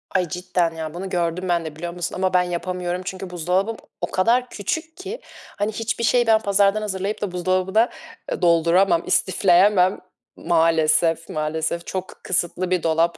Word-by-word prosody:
Ay, 180 -1 +2
cidden 175 0 -1
ya. 160 -1 -5
Bunu 190 +3 -5
gördüm 175 +1 -1
ben 170 -2 +1
de, 155 - -7
biliyor 170 +2 -5
musun? 175 -1 -4
Ama 185 0 0
ben 180 - +5
yapamıyorum 180 +1 -3
çünkü 190 0 -6
buzdolabım 180 +6 -1 0.2
o - - -3
kadar 240 +6 +2
küçük 320 - -4
ki! 390 +6 -7 0.4
Hani 205 +1 0
hiçbir 225 +1 -3
şeyi 240 +1 +3
ben 220 -1 +5
pazardan 200 +1 +2
hazırlayıp 200 0 -3
da 205 -3 -2
buzdolabına, 185 +5 +1 0.4
ııı, - - -3
dolduramam, 170 +1 +3
istifleyemem 185 +1 +3 0.4
Maalesef, 165 0 +2
maalesef, 160 +2 -2
çok 185 0 -5
kısıtlı 180 0 -1
bir 180 -2 +1
dolap. 165 +1 +1
180 Hz, 160 wpm, -22 LUFS, 170-200 Hz, 0.4 s, ben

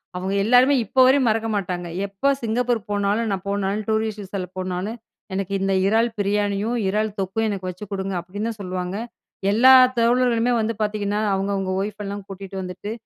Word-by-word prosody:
அவங்க 185 +2 -2
எல்லாருமே 250 +5 +5
இப்போ 260 - -1
வரையும் 260 -1 +4
மறக்க 225 +1 0
மாட்டாங்க. 180 -3 -3 0.2
எப்ப 235 +9 0
சிங்கப்பூர் 235 +1 0
போனாலும் 205 +2 0
நான் 190 -2 -2
போனாலும் 200 +1 -1
டூரிஸ்ட் 220 -1 -1
விசால 190 -1 -4
போனாலும், 185 +4 -3 0.4
"எனக்கு 195 +1 -3
இந்த 195 0 +1
இறால் 225 +3 +3
பிரியாணியும் 205 +2 0
இறால் 215 +2 0
தொக்கும் 195 +4 -1
எனக்கு 190 -2 -4
வச்சு 185 +3 -7
கொடுங்க." 195 -1 -3
அப்படின்னு 200 +5 -5
தான் 220 - -7
சொல்லுவாங்க. 185 0 -4 0.6
எல்லா 250 +5 +7 0.2
தோழர்களுமே 240 0 +3
வந்து 225 +1 -1
பார்த்தீங்கன்னா, 210 -1 -1
அவங்கவுங்க 195 -1 -1
ஒய்ஃப் 210 +1 -5
எல்லாம் 200 0 -5
கூட்டிட்டு 195 0 -8
வந்துட்டு 185 +3 -6
205 Hz, 160 wpm, -22 LUFS, 195-225 Hz, 0.6 s, எல்லா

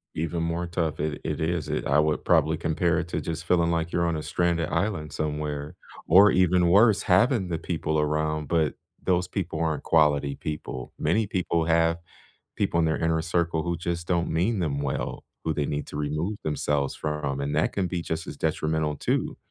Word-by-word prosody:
Even 85 +1 -2
more 85 +1 -2
tough. 85 -3 -2
It 75 -1 -2
it 75 -2 -3
is. 80 -2 -1
It - - -2
I 70 - +3
would 75 0 +1
probably 80 -2 +3
compare 85 +1 +1
it 85 - -4
to - - -2
just 80 -2 -4
feeling 85 -1 +2
like 85 0 -1
you're 85 0 +2
on 85 -1 0
a 75 - -5
stranded 85 -2 0
island 85 -4 -1
somewhere 75 -1 -3 0.3
or 95 +5 +7
even 90 -1 +3
worse, 100 +3 +5
having 105 +2 +3
the 85 -2 -2
people 80 -1 -2
around, 75 0 0
but 80 -4 +2 0.3
those 90 -1 +1
people 90 -5 -3
aren't 80 -2 -1
quality 75 -3 +3
people. 75 -4 -6
Many 100 +7 +1
people 90 -4 0
have 85 0 +3 0.6
people 85 - +1
in 80 - +2
their 80 - +1
inner 80 0 +1
circle 85 -1 0
who 85 0 -2
just 85 0 -3
don't 85 -2 +1
mean 95 +6 +1
them 75 -5 -1
well, 70 -2 -3 0.2
who 80 - +1
they 75 -2 -1
need 75 0 -3
to - - -7
remove 75 +7 -2
themselves 75 -2 -1
from, 75 -3 -3
and 70 +1 -2
that 75 - +1
can 95 -2 0
be 90 -1 -2
just 80 -1 -4
as 70 - -7
detrimental 80 0 -1
too. - - -1
80 Hz, 195 wpm, -26 LUFS, 75-85 Hz, 0.6 s, or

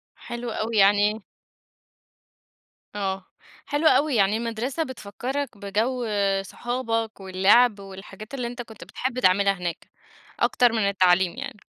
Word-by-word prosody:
حلو 240 -1 -6
أوي 220 0 -2
يعني 205 +2 +4 1.7
آه، 195 -2 -3 0.4
حلو 300 +2 +1
أوي، 290 -4 +3
يعني 205 +1 +3
المدرسة 235 +7 -2
بتفكرك 260 0 -5
بجو 220 +5 -1 0.4
صحابك، 225 +1 -3
واللعب 200 +4 +4
والحاجات 195 +3 -11
اللي 250 -3 -3
أنت 245 +1 -6
كنت 220 -3 -11
بتحب 255 0 -4
تعملها 195 -1 +4
هناك، 175 -3 -5 0.5
أكتر 245 -2 +3
من 220 -3 +1
التعليم 185 -2 +3
يعني. 265 -5 -7
220 Hz, 120 wpm, -24 LUFS, 195-245 Hz, 1.7 s, يعني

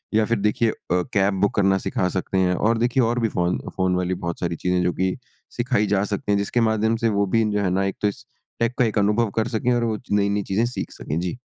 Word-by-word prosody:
या 110 - +4
फिर 115 -1 0
देखिए 105 +2 +1
अ, - - -8 0.3
कैब 100 +2 +1
बुक 100 - +2
करना 95 -1 +3
सिखा 90 - 0
सकते 95 +1 -2
हैं। 90 -1 +2
और 115 +2 +1
देखिए 120 +2 +2
और 120 +2 +1
भी 115 -2 +1
फ़ोन, 90 -1 0 0.2
फ़ोन 95 -1 +1
वाली 90 0 0
बहुत 85 -1 -4
सारी 85 -1 -2
चीज़ें 90 +1 0
हैं 90 - +1
जो 90 - +1
कि 95 0 0 0.4
सिखाई 120 -4 +1
जा 100 0 +2
सकती 100 +1 -2
हैं। - - +3
जिसके 115 +4 0
माध्यम 110 +1 +1
से - - +4
वो 100 -1 +1
भी 115 +3 +2
जो 105 0 0
है 95 - +1
ना 95 +1 +1
एक 95 - -2
तो 105 - +3
इस 100 - -5 0.3
टेक 115 +1 +1
का 125 - +5
एक 110 -1 -1
अनुभव 105 +2 +2
कर 110 0 +1
सकें 120 +1 0
और 120 -1 +1
वो 110 -2 0
नई-नई 100 0 +1
चीज़ें 105 +5 0
सीख 125 - -4
सकें। 75 +3 -4
जी। 90 +6 -3
105 Hz, 265 wpm, -23 LUFS, 95-115 Hz, 0.4 s, का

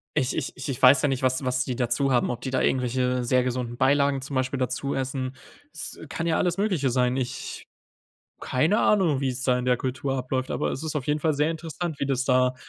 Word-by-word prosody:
Ich 130 - +1
ich 145 - -3
ich 130 +1 -5
ich 130 - -4
weiß 130 +1 +7
ja - - +4
nicht, 135 -2 -1
was 130 +1 +1
was 130 0 +1
die 125 - -3
dazu 125 +2 0
haben, 125 -1 +2
ob 120 - -5
die 130 - -3
da 130 - 0
irgendwelche 125 0 +1
sehr 125 +1 +2
gesunden 125 -1 -3
Beilagen 140 +1 +3
zum 135 +1 -6
Beispiel 130 +1 0
dazu 130 +2 -2
essen. 130 0 -3 0.4
Es - - -8
kann 165 - -3
ja 165 -1 +2
alles 175 0 +1
Mögliche 185 -10 +1
sein. 125 0 +1
Ich 130 -2 -4 0.7
keine 155 - +1
Ahnung, 175 -10 +3
wie 135 - 0
es 125 0 -5
da 125 0 +2
in 125 - -3
der 125 -1 +2
Kultur 130 +1 -2
abläuft, 130 0 -2
aber - - -1
es 135 - -4
ist 160 -1 -3
auf 135 - -3
jeden 150 +1 0
Fall 160 0 +2
sehr 150 +2 +1
interessant, 165 -1 -5
wie - - -1
das 130 -2 0
da 125 -1 +3
130 Hz, 235 wpm, -25 LUFS, 125-140 Hz, 0.7 s, weiß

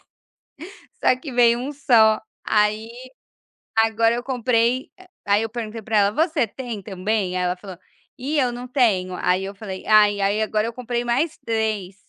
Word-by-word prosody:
2, - - -32 1.0
só - - +5
que 275 0 -8
veio 235 -1 +4
1 275 +4 -5
só, 225 -6 +4 0.2
aí 215 +1 +1 0.9
agora 225 +1 +3
eu 240 - -3
compre, 250 0 0
ah, 370 - -16 0.2
aí 205 +1 +3
eu 225 - -3
pergunte 225 -1 -6
para 215 +1 -1
ela: 200 0 +4
"Você 315 - +1
tem 235 -3 -7
também?", 190 -1 -2
aí 180 - 0
ela 180 0 0
falou: 185 -2 -10 0.4
"Ih, 290 +4 -1
eu 250 -3 +1
não 245 +1 -7
tenho", 205 -9 +1
aí 185 +2 0
eu 200 +1 -7
falei: 195 -2 -8
"ai", 210 -1 +5
aí 200 +2 +1
agora 215 0 0
eu 230 - -5
comprei 240 0 -3
mais 275 +7 0
3. 215 -4 -2
225 Hz, 180 wpm, -22 LUFS, 205-245 Hz, 1.0 s, só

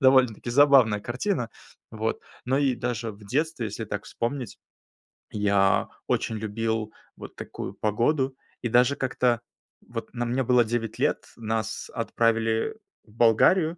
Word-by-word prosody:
довольно-таки 130 -4 +4
забавная 130 -5 +5
картина. 125 - -2 0.4
Вот. 110 +1 -2 0.2
Но 130 +2 +1
и 135 -3 +2
даже 120 -2 -3
в 100 0 -15
детстве, 140 +1 -1
если 110 +2 -5
так 100 0 -4
вспомнить, 125 +1 -4 0.7
я 100 -2 +2 0.2
очень 110 - 0
любил 110 0 -2 0.3
вот - - -10
такую - - -6
погоду. 130 +5 +1 0.3
И - - +1
даже 125 +4 +4
как-то 125 -2 +1 0.5
вот 115 -2 -6
на 120 - -1
мне 125 +3 0
было 125 -1 +4
9 115 -1 -2
лет, - - 0
нас 110 -1 -3
отправили 115 - +1 0.3
в 105 - -21
Болгарию, 155 - +4
115 Hz, 135 wpm, -26 LUFS, 110-130 Hz, 0.7 s, забавная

